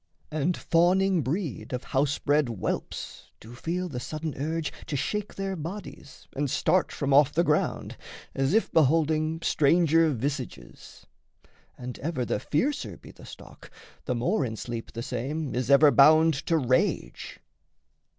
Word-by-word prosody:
And 155 +3 0
fawning 180 +2 +2
breed 150 - -4
Of 125 - -3
house 140 +1 0
bred 145 -1 +1
whelps 110 -6 -5
do 115 +2 -12
feel 175 +8 -3
the 130 -7 -5
sudden 155 +4 -5
urge 160 +3 -3
To 145 - -3
shake 210 +9 -3
their 195 0 -3
bodies 165 -5 -9
and 145 0 -1
start 185 +8 +1
from 140 -2 -1
off 145 0 +5
the 170 - +2
ground, 150 -3 -1 0.4
As 135 +7 0
if 225 - +1
beholding 155 +1 +2
stranger 165 +2 +3
visages. 135 0 -6 0.7
And 125 0 -7
ever 140 -4 -2
the - - -1
fiercer 270 - -2
be - - -14
the - - -15
stock, - - -13 0.4
the 125 - -1
more 140 - 0
In 115 -3 -3
sleep 115 +1 -6
the 115 - -5
same 135 +5 -4
is 125 0 -2
ever 140 +1 +7
bound 155 +4 +6
to 165 - +3
rage. 130 -3 -1
150 Hz, 150 wpm, -27 LUFS, 130-165 Hz, 0.7 s, ever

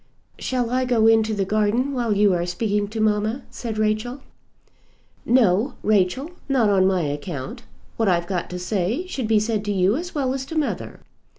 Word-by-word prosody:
"Shall 245 -2 -1
I 255 +1 +1
go 235 -3 +2
into 220 -1 +4
the 195 -1 0
garden 215 +7 +1
while 240 -4 -1
you 205 -2 +4
are 175 -1 0
speaking 205 +3 -1
to 220 +2 -6
mamma?" 215 +4 +1
said 225 -3 -5
Rachel. 215 +5 -1 1.0
"No, 230 -1 +3
Rachel; 215 - +1 0.2
not 240 -6 +3
on 190 -1 +4
my 190 -2 +2
account. 150 - -5 0.4
What 225 -3 +2
I've 170 -1 +2
got 180 -2 -3
to 180 - -5
say 200 - -1
should 265 -10 -4
be 220 -1 +4
said 215 -1 -1
to 205 - -1
you 195 +2 +2
as 345 +4 -5
well 265 -3 0
as 270 -1 -3
to 320 - -5
mother. 305 - -3
215 Hz, 185 wpm, -23 LUFS, 195-245 Hz, 1.0 s, into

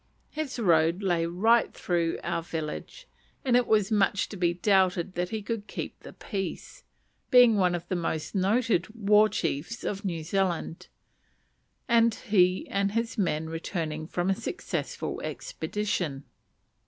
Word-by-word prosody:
His 300 -3 -4
road 170 -3 +3
lay 170 -3 +1
right 220 +7 +3
through 170 -2 -1
our 165 - -1
village, 165 - -6 0.4
and 250 -2 +3
it 245 -1 +3
was 210 -2 +2
much 200 -1 +2
to - - -7
be 175 -2 +1
doubted 185 -1 +2
that 180 0 -2
he 215 -1 -4
would 225 -2 -3
keep - - -6
the - - -11
peace, 195 -4 -6 0.5
being 245 -3 +7
one 180 -3 +2
of 175 0 -6
the 185 - -1
most 165 -3 -3
noted 205 0 +2
war 210 0 +4
chiefs 165 - -3
of 200 +1 -3
New 170 -5 -3
Zealand, 180 -1 -1 1.0
and 230 -2 +4
he 185 -5 +2
and 200 0 0
his 230 +1 -2
men 160 -4 0
returning 160 -1 -4
from 175 +2 0
a - - +1
successful 385 - -4
expedition. 200 - -3
190 Hz, 145 wpm, -28 LUFS, 170-220 Hz, 1.0 s, being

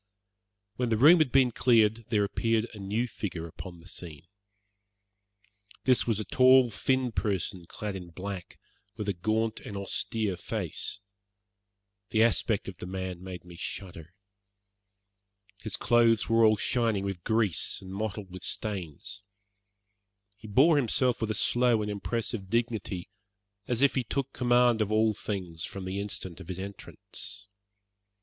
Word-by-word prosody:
When 125 -1 0
the 110 - +2
room 155 +9 +8
had 155 -5 +3
been 130 -2 +5
cleared 115 -2 +3
there 105 -2 +3
appeared 115 +2 0
a 105 - -9
new 105 +5 -1
figure 90 -7 -5
upon 85 +2 -9
the 85 +1 -15
scene. 80 -4 -7 1.6
This 130 -2 +3
was 110 -3 +1
a 110 - -3
tall, 130 +2 +6
thin 130 +2 0
person 95 -5 -2
clad 105 +2 -5
in 90 -2 -7
black, 95 +1 -7 0.4
with 105 -2 -4
a 100 - +1
gaunt 110 +5 0
and 100 - -7
austere 100 0 -2
face. 100 - -3 1.1
The 110 0 +4
aspect 115 -10 +1
of - - -8
the - - -6
man 95 -1 -4
made 90 -1 -8
me 90 -1 -11
shudder. 85 -1 -7 1.5
His 110 -2 -4
clothes 115 -2 +4
were 115 0 +5
all 110 -1 +5
shining 115 -3 +1
with 95 -3 -4
grease 110 -7 0
and 95 0 -9
mottled 105 -1 -4
with 95 0 -8
stains. 95 -1 -5 1.1
He 105 +2 -12
bore 140 +9 +5
himself 125 -2 +1
with 110 - -1
a 110 - 0
slow 120 +1 +2
and 105 - -3
impressive 105 -1 -3
dignity, 110 -5 -2 0.6
as 120 +2 +1
if 140 - +5
he 130 - 0
took 135 +3 -3
command 120 -2 +3
of 105 0 0
all 110 0 +3
things 90 -6 -5
from 95 -1 -5
the 95 +1 -3
instant 95 -3 -5
of 95 - -10
his 90 -1 -5
entrance. 100 0 -6
105 Hz, 150 wpm, -29 LUFS, 95-115 Hz, 1.6 s, room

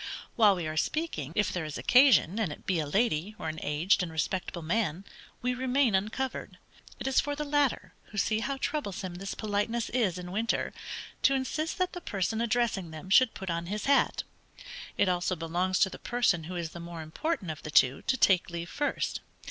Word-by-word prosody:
While 210 -4 +6
we 175 -3 -3
are 155 0 -4
speaking, 230 - -1
if 210 -3 +1
there 180 - -2
is 155 -2 -5
occasion, 245 - +5
and 205 -8 0
it - - -10
be 185 -3 +1
a 150 - -1
lady, 200 +1 +1
or 160 - -4
an 155 0 -5
aged 155 +8 +2
and 175 -2 -3
respectable 170 +2 -2
man, 185 0 -1 0.4
we 250 0 +1
remain 255 -1 +2
uncovered: 220 +7 -2 0.4
it - - -6
is 270 -1 +3
for 290 0 -3
the 300 - -3
latter, 290 -2 0
who 210 - -11
see 215 +2 +2
how 275 +4 -2
troublesome 200 - -3
this 190 +2 -5
politeness 215 +2 -1
is 215 -8 +1
in 180 0 -7
winter, 220 +4 -1 0.5
to 275 - +4
insist 305 +4 -2
that 365 -1 0
the 355 - -6
person 220 - -1
addressing 230 -6 0
them 160 +4 -9
should 255 +3 +6
put 190 -3 -4
on 170 0 -3
his 210 +3 -3
hat. 280 0 +3 0.7
It - - +3
also 180 0 +1
belongs 175 +3 0
to 190 - +5
the - - -9
person 225 -9 +1
who 180 +2 -6
is 170 -2 -3
the 170 - -8
more 170 -1 -7
important 185 - -2
of 155 - -8
the - - -7
two, 130 -3 +4
to 260 - 0
take 185 -6 +4
leave 170 0 -5
first. 290 - -1
195 Hz, 205 wpm, -29 LUFS, 170-245 Hz, 0.7 s, While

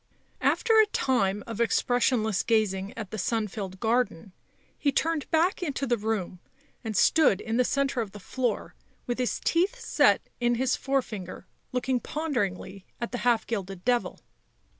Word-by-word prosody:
After 450 -2 +3
a 435 - +6
time 205 - 0
of 230 0 -4
expressionless 235 -3 +2
gazing 200 -3 +1
at 215 -4 -6
the 220 - -4
sun 220 +3 0
filled 190 -2 -6
garden, 220 -5 0 0.4
he 285 - +1
turned 320 0 0
back 335 +4 +2
into 285 -5 -2
the 240 -2 +2
room, 210 -5 -3 0.4
and 220 -3 -3
stood 310 -12 +4
in 225 +2 -2
the 250 - +4
centre 275 -1 0
of 220 - -4
the 205 - -10
floor, 250 +5 -2 0.3
with 245 0 -3
his 250 - 0
teeth 375 +9 +2
set 465 - +3
in 240 0 +2
his 255 +2 +1
forefinger 220 -11 -3 0.3
looking 250 0 0
ponderingly 200 - -3 0.2
at 235 - -4
the 245 - -3
half 240 -2 +2
gilded 195 -4 -5
devil. 240 -6 0
235 Hz, 160 wpm, -27 LUFS, 205-265 Hz, 0.4 s, a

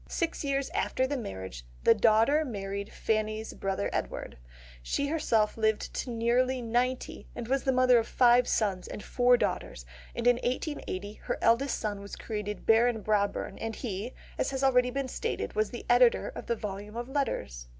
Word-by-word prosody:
Six 335 -2 -2
years 275 -1 -1
after 260 - 0
the 285 +2 -2
marriage, 95 - -6 0.2
the - - +7
daughter 230 +8 +4
married 200 -5 -5
Fanny's 215 0 -1
brother 190 - -2
Edward. - - -3 0.5
She 280 - -1
herself 230 -10 +1
lived 220 -1 0
to - - -3
nearly 245 +3 +1
ninety, 245 +2 -1
and 240 -2 -5
was 270 +2 +1
the 265 - +3
mother 255 -1 +5
of 225 - -3
five 245 0 +5
sons 195 -4 0
and - - -7
four 245 0 +4
daughters, - - -2 0.3
and 235 - -3
in 245 -1 +5
1880 245 - -3
her - - -1
eldest 245 +5 +3
son 205 -2 -3
was 200 - -8
created 210 -2 -5
Baron 225 0 +4
Brabourne; 205 -1 0
and 225 -1 -4
he, 220 0 -5 0.2
as - - +1
has 270 -1 -3
been 270 - +5
already 250 +2 +1
stated, - - -3
was 215 -1 +1
the 240 - -8
editor 245 0 +4
of - - -9
the 235 - +1
volumes 205 +1 -6
of 240 0 -4
Letters. 65 - -2
235 Hz, 175 wpm, -29 LUFS, 210-255 Hz, 0.5 s, the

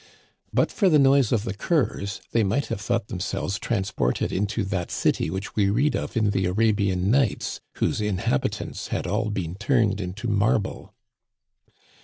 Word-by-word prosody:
But - - +2
for 195 -4 +3
the 155 - +5
noise 135 -3 +4
of 115 -4 +2
the 110 - -3
curs 100 - -1
they 115 - +3
might 105 +8 +1
have 100 - -4
thought 115 -1 -1
themselves 95 +1 -3
transported 95 - -1
into 100 +2 -1
that 95 -2 -2
city - - 0
which 95 +4 -5
we 100 -2 +3
read 135 +9 +2
of - - -3
in 105 -2 +2
the 95 -2 +1
Ara 110 +4 +3
bian 95 -3 0
Nights 115 +3 +1
whose - - 0
inhabitants 95 -9 -1
had - - -2
all - - 0
been 90 -5 -3
turned 105 -1 +1
into 95 +6 -5
marble. 105 -1 0
105 Hz, 165 wpm, -25 LUFS, 95-115 Hz, -, the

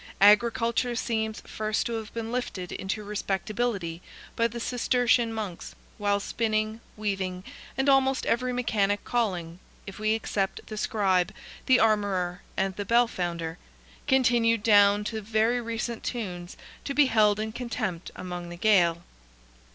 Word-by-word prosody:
Agriculture 230 +3 +4
seems 220 -2 -2
first 215 0 -2
to 235 - -2
have 220 -1 -5
been 230 0 -5
lifted 210 -7 -3
into 205 +3 -3
respectability 200 -3 -2 0.3
by 230 - +3
the 235 +1 -7
Cistercian 245 -1 +2
Monks, 210 -6 -6 0.2
while 205 -1 +2
spinning, 215 +1 -1 0.2
weaving, 190 -3 -2 0.3
and 265 +1 +1
almost 270 -1 +3
every 250 +2 +1
mechanic 205 -5 0
calling, 180 -8 -2 0.3
if 195 - -9
we 215 0 +2
except 200 -3 -2
the 215 - -7
scribe, 195 -4 +1 0.4
the 260 -1 +6
armorer, 200 -5 +1 0.2
and 190 -1 0
the 205 - -2
bell 235 +4 +4
founder, 170 -4 -4 0.5
continued 235 -4 +3
down 205 -1 +5
to 220 +1 -4
very 220 +3 +1
recent 230 0 -4
tunes 180 -7 -5 0.3
to 280 - -4
be 295 - +6
held 215 -4 +3
in 220 0 -2
contempt 220 -7 -4
among 175 -1 -6
the 175 - -8
Gael. 175 -4 +3
215 Hz, 140 wpm, -27 LUFS, 195-235 Hz, 0.5 s, the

